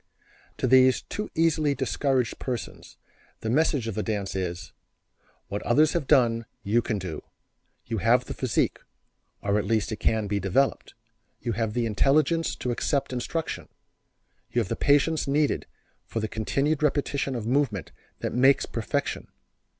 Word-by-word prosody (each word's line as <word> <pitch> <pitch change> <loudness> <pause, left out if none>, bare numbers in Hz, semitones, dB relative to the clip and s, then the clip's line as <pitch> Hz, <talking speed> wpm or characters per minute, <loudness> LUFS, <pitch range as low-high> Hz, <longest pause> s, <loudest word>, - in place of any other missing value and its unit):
To - - -1
these 130 0 +5
too 210 - -5
easily 155 -3 +2
discouraged 130 -2 0
persons 120 -9 -6 0.4
the 110 - -2
message 140 -3 +2
of 115 - -2
the 105 - -2
dance 105 -3 -3
is: 90 -2 -4 0.7
"What 100 - -4
others 150 +6 +3
have 165 -6 -1
done 115 -5 +3 0.2
you 110 +4 +2
can 115 -2 -2
do. 90 -5 -5 0.6
You 115 -2 -2
have 120 +6 +3
the - - -5
physique, 130 -5 0 0.6
or 100 +1 +2
at 100 - -2
least 110 +1 0
it 110 - -3
can 110 -1 +1
be 100 0 -1
developed. 100 +9 0 0.4
You 120 - -2
have 110 0 -1
the 120 -1 +1
intelligence 150 +9 +2
to 125 - -3
accept 135 +2 -1
instruction. 140 +6 -3 0.8
You 120 - +1
have 105 - -4
the - - -1
patience 145 +2 +2
needed 145 +1 +1 0.4
for 115 - -3
the 110 - -1
continued 140 +8 0
repetition 140 -2 0
of 115 -3 -4
movement 125 - 0 0.3
that - - -2
makes 130 +3 +4
perfection. - - -3
125 Hz, 155 wpm, -26 LUFS, 110-140 Hz, 0.8 s, these